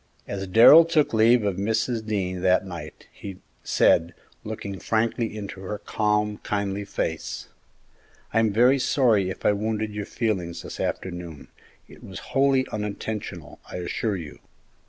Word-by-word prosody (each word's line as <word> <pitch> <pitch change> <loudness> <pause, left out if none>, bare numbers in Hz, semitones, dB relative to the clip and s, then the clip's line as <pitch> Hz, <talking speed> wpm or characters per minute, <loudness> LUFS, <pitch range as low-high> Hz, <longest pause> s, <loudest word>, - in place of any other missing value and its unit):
As 95 -1 -4
Darrell 115 - +9
took 160 -5 +1
leave 115 +1 +5
of 100 -3 -1
Mrs. 110 +3 -1
Dean 95 -4 -2
that 95 +1 +3
night, 90 -3 -9
he 95 -2 -9 0.3
said, 85 +1 +3 0.3
looking 100 -3 -6
frankly 115 0 -1
into 100 -2 -7
her 100 +2 -4
calm, 105 0 -1
kindly 100 -1 -2
face, - - -4 0.8
"I 110 - +3
am 110 -2 +2
very 125 +6 +4
sorry 115 -8 +2
if 95 - -8
I - - +6
wounded 110 +1 -2
your 105 -1 -5
feelings 95 -7 -2
this - - -8
afternoon; 90 -5 -5 0.4
it - - -16
was - - -9 0.2
wholly 135 -1 +3
unintentional, 105 -6 -5
I - - -8
assure 100 +4 -2
you." 80 -5 -8
105 Hz, 145 wpm, -25 LUFS, 95-110 Hz, 0.8 s, Darrell